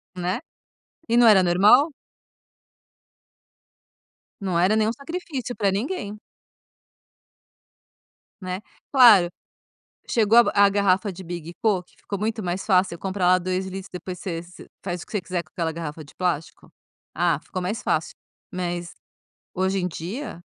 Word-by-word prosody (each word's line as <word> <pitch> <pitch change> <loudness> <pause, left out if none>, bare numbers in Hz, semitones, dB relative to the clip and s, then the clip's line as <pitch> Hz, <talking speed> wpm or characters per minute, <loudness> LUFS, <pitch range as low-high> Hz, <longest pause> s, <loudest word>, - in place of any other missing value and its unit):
Né, 180 +1 -2 0.7
e 235 - +3
não 240 - +7
era 195 -4 +7
normal? 205 - +5 2.5
Não 185 -3 0
era 190 +5 +3
nenhum 220 0 +2
sacrifício 280 -2 -5
pra 200 -3 +1
ninguém. 210 - -3 2.2
Né, 185 0 -4 0.3
claro, 225 -10 +7 0.8
chegou 225 -1 +3 0.2
a 200 0 +6
garrafa 200 0 +2
de 185 +1 -10
big 170 -1 -6
po 200 -5 +3
que 180 - -26
ficou 200 - -6
muito 220 0 -2
mais 180 +2 -2
fácil 185 -3 +3
eu 170 - -9
comprar 190 -1 -2
lá 185 0 +6
2L 185 +1 -2
litros 190 0 -7
depois 180 0 -7
você 170 -3 -4
você 180 +1 -14 0.2
faz 175 -2 -4
o - - -9
que - - -19
você 205 - 0
quiser 175 0 -3
com 155 - -27
aquela 165 -3 -2
garrafa 160 -1 -6
de 145 - -17
plástico? 170 -4 -3 0.5
Ah, 170 -3 +2
ficou 185 - -5
mais 200 +5 -3
fácil. 160 - -1 0.4
Mas, 175 -1 -3 0.6
hoje 190 +1 0
em 180 - 0
dia, 180 - -6
185 Hz, 145 wpm, -24 LUFS, 175-210 Hz, 2.5 s, não